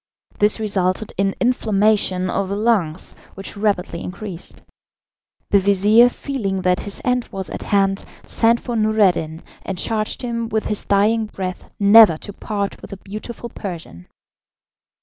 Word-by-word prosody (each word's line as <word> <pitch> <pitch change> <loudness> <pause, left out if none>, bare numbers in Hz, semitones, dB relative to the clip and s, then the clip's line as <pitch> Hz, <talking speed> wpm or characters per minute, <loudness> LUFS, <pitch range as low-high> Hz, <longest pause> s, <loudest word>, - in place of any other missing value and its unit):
This 210 +2 +3
resulted 200 -1 -1
in 195 +1 0
inflammation 210 -6 +2
of 190 +1 -2
the 200 - -2
lungs, 200 -7 0 0.2
which 195 - -7
rapidly 200 -5 -1
increased. 180 -1 -8 0.9
The 200 - +6
vizir, 205 +5 +5
feeling 205 -9 -3
that 180 0 +2
his 205 - -5
end 250 -1 +1
was 190 -1 -5
at - - -5
hand, 195 -1 +1 0.2
sent 230 +1 +2
for 240 - -5
Noureddin, 200 -7 +1 0.2
and 190 - -5
charged 215 +5 -2
him 230 -2 -3
with 220 -1 -1
his 210 - -3
dying 215 +2 +2
breath 185 -3 -6
never 205 -4 +7
to 205 - -9
part 200 -1 -4
with - - -10
the 200 - -8
beautiful 215 +5 -8
Persian. 165 - -8
200 Hz, 145 wpm, -20 LUFS, 190-220 Hz, 0.9 s, never